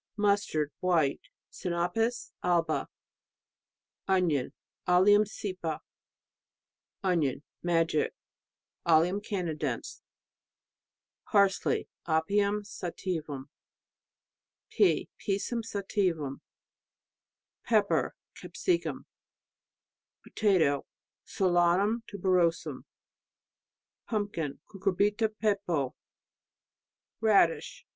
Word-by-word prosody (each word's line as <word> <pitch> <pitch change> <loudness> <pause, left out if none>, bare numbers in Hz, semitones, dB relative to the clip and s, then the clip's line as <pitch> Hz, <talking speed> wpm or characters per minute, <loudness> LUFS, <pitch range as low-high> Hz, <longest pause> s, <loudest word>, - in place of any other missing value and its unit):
Mustard, 200 -8 +1
white.. 170 -6 +2 0.3
Sinapis 185 +7 -1
alba. 170 -3 +1 1.2
Onion 175 -9 +2 0.4
Allium 205 +4 +6
cepa. 185 -6 -4 1.2
Onion, 160 -7 +1 0.2
magic... 165 -3 +1 0.7
Allium 170 +4 +3
canadense. 180 -7 -3 1.3
Parsley 200 -3 +2 0.2
Apium 200 +6 +1
sativum. 160 -8 -5 1.2
Pea 400 - +3
Pisum 210 +4 -1
sativum. 185 -9 -1 1.3
Pepper 215 -3 +2 0.2
Capsicum. 355 -3 -2 1.2
Potatoe.... 180 -10 +2 0.4
Solanum 185 +4 +2
tuberosum. 180 -4 +1 1.2
Pumpkin.... 205 - -2
Cucurbita 205 +3 +1
pepo. 195 - 0 1.3
Radish.... 205 -7 +2
185 Hz, 55 wpm, -29 LUFS, 165-205 Hz, 1.3 s, Allium